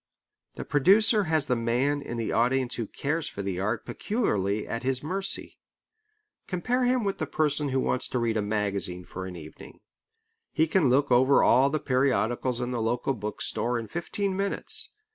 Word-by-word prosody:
The - - -6
producer 200 - +4
has 160 -3 +1
the 125 - +1
man 125 +5 0
in 120 - -6
the 115 - -2
audience 125 +2 +1
who 115 -3 -3
cares 150 +7 -2
for 100 - -6
the 95 -2 -3
art 105 +4 -2
peculiarly 105 - -1
at 115 - -3
his 130 0 -1
mercy. 190 +5 -2 0.9
Compare 245 +8 0
him 250 -1 +2
with 195 -1 -2
the 155 - -2
person 150 -1 0
who 130 0 0
wants 125 - -1
to 130 - -2
read 115 -2 0
a 110 - +1
magazine 100 -4 -2
for 95 +1 -7
an 90 - -8
evening. 80 -2 -12 0.7
He 160 - +2
can 160 -3 +2
look 140 +2 +2
over 130 +3 +5
all 135 +2 +5
the 155 +2 -1
periodicals 125 -2 0
in 125 0 -2
the 120 -2 -2
local 120 +4 0
book 105 -3 -5
store 120 +1 0
in 115 -1 -5
fifteen 190 - -2
minutes. 195 +1 -3
130 Hz, 180 wpm, -27 LUFS, 115-155 Hz, 0.9 s, over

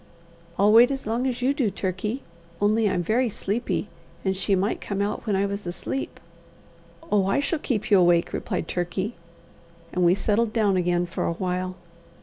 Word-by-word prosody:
"I'll 205 +2 +5
wait 235 +2 +8
as 270 -1 -4
long 235 +4 0
as 245 -1 -2
you 270 +2 +3
do, 265 -7 +1
Turkey; 195 +6 -3 0.4
only 210 +1 +3
I'm 180 -2 0
very 235 +6 +1
sleepy, 210 +3 -2 0.4
and 190 0 +1
she 195 +1 +1
might 195 +3 -1
come 200 -1 -3
out 205 +3 -2
when 205 - +2
I 195 +1 +2
was 200 -1 -4
asleep." 180 +9 -4 0.9
"Oh, 200 -2 +3
I 195 - +2
shall 300 +3 -1
keep 220 -7 -2
you 200 - +7
awake!" 175 -1 +3
replied - - -3
Turkey; 185 +5 -2 0.8
and 180 - +1
we 175 +1 +5
settled 215 +2 +1
down 210 -4 +2
again 175 -1 +1
for 170 - -3
a - - 0
while. 185 +1 -2
200 Hz, 180 wpm, -25 LUFS, 185-225 Hz, 0.9 s, wait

